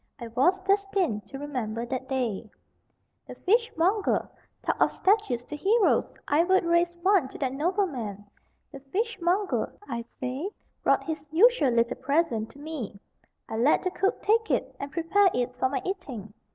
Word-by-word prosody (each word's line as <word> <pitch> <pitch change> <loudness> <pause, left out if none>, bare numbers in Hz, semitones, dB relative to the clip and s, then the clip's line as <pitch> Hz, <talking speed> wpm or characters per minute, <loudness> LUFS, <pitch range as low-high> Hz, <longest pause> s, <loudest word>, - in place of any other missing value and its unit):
I 235 -2 -7
was 275 +12 +3
destined 390 - 0
to 270 - -8
remember 240 -6 -3
that 260 +1 -4
day. 235 -5 -2 0.8
The - - -8
fishmonger 415 -2 +1 0.4
(talk - - -1
of - - +5
statues 380 - +1
to 300 - -7
heroes! 405 +9 +2
I 300 +3 +4
would 375 0 +3
raise 340 +1 +2
one 380 -7 +4
to - - -10
that 265 -3 -1
noble 360 +8 +1
man!) 215 - -6 0.5
the 275 - -9
fishmonger, 380 - -1 0.2
I 235 0 -3 0.2
say, 260 +8 -3 0.3
brought - - +3
his 315 -3 -4
usual 380 - +5
little 235 +1 +1
present 280 -7 0
to - - -16
me. 290 -10 -6 0.5
I 220 - -4
let 250 +6 +3
the 370 - -1
cook 385 +2 -1
take 445 +1 +2
it - - -1
and 280 0 -5
prepare 355 +5 +3
it 250 0 -1
for 260 - +2
my 270 - -2
eating. 260 - -5
300 Hz, 165 wpm, -27 LUFS, 250-380 Hz, 0.8 s, of